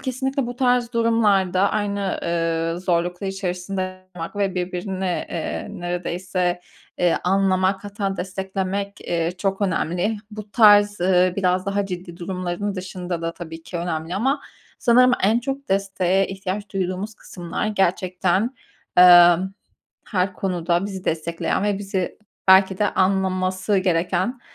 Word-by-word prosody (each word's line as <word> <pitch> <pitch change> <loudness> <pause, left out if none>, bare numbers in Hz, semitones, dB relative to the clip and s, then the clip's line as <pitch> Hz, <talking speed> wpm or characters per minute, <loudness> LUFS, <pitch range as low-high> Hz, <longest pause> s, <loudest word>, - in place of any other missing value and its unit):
kesinlikle 265 0 -2
bu 245 0 -6
tarz 245 -2 +2
durumlarda 205 -5 +2
aynı, 200 -2 -1
eee, 165 0 -1
zorluklar 175 +1 -1
içerisinde 185 0 -4
olmak 165 +4 -6
ve 195 -2 0
birbirine, 185 0 -2
eee, 165 - -3
neredeyse, 175 +1 -2 0.4
eee, 175 -2 +2
anlamak, 190 +1 +2
hatta 200 -1 -3
desteklemek, 190 +2 -3
eee, 170 0 -1
çok 195 0 -1
önemli. 185 +2 0
Bu 210 -1 -9
tarz, 205 -3 +6
ııı, 180 0 +3
biraz 185 -1 +1
daha 200 0 0
ciddi 175 -2 -7
durumların 185 +2 -3
dışında 180 -2 -5
da 165 0 -2
tabii 165 -1 -9
ki 175 - -7
önemli 170 0 -3
ama 270 +8 +1 0.4
sanırım 250 +1 +5
en 215 +5 +4
çok 270 0 -5
desteğe 195 -1 +1
ihtiyaç 195 +1 -5
duyduğumuz 190 +2 -3
kısımlar 175 +1 -5
gerçekten, 190 +2 0 0.4
emm, 175 +1 +7 0.5
her 185 -2 0
konuda 175 0 -1
bizi 190 -2 -7
destekleyen 165 +4 -1
ve 205 -1 0
bizi 195 -2 -3 0.3
belki 190 0 +6
de 210 - +2
anlaması 185 +1 +1
gereken, 185 +6 0
190 Hz, 125 wpm, -22 LUFS, 180-200 Hz, 0.5 s, emm